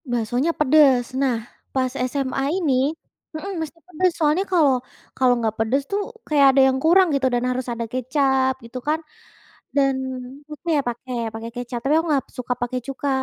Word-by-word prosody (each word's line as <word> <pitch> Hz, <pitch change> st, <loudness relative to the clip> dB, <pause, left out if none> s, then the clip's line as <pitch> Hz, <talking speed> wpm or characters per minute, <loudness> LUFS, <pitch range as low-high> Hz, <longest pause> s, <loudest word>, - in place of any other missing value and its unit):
Baksonya 245 Hz, +6 st, 0 dB
pedes. 275 Hz, -4 st, +4 dB
Nah 240 Hz, -5 st, 0 dB, 0.3 s
pas 255 Hz, -1 st, 0 dB, 0.2 s
SMA 270 Hz, 0 st, -2 dB, 0.2 s
ini 310 Hz, -8 st, +1 dB, 0.6 s
mhm, 390 Hz, +5 st, -5 dB
mesti 320 Hz, +1 st, -6 dB
pedes 360 Hz, +1 st, +1 dB
soalnya 310 Hz, +4 st, +2 dB
kalau 285 Hz, -8 st, +4 dB, 0.4 s
kalau 255 Hz, -1 st, +4 dB
nggak 220 Hz, -2 st, -1 dB
pedes 230 Hz, +5 st, +1 dB
tuh 405 Hz, +1 st, +1 dB, 0.3 s
kayak 290 Hz, -2 st, +4 dB
ada 270 Hz, 0 st, +4 dB
yang 265 Hz, 0 st, +1 dB
kurang 365 Hz, +4 st, +6 dB
gitu 265 Hz, -1 st, +2 dB
dan 245 Hz, 0 st, 0 dB
harus 255 Hz, 0 st, -2 dB
ada 235 Hz, 0 st, -3 dB
kecap 260 Hz, +2 st, +1 dB
gitu 235 Hz, +2 st, -7 dB
kan, 310 Hz, +1 st, +2 dB, 0.8 s
dan 275 Hz, -1 st, +3 dB, 0.6 s
suka 300 Hz, +3 st, -11 dB
ya -, -, +3 dB
pakai 245 Hz, +1 st, -6 dB, 0.2 s
pakai 225 Hz, +1 st, -6 dB
kecap. 245 Hz, 0 st, -4 dB
Tapi 280 Hz, -, +3 dB
aku 335 Hz, -, -6 dB
nggak 275 Hz, -3 st, +1 dB
suka 250 Hz, 0 st, -1 dB
pakai 245 Hz, +1 st, -1 dB
cuka, 275 Hz, +1 st, -3 dB
265 Hz, 170 wpm, -22 LUFS, 245-300 Hz, 0.8 s, kurang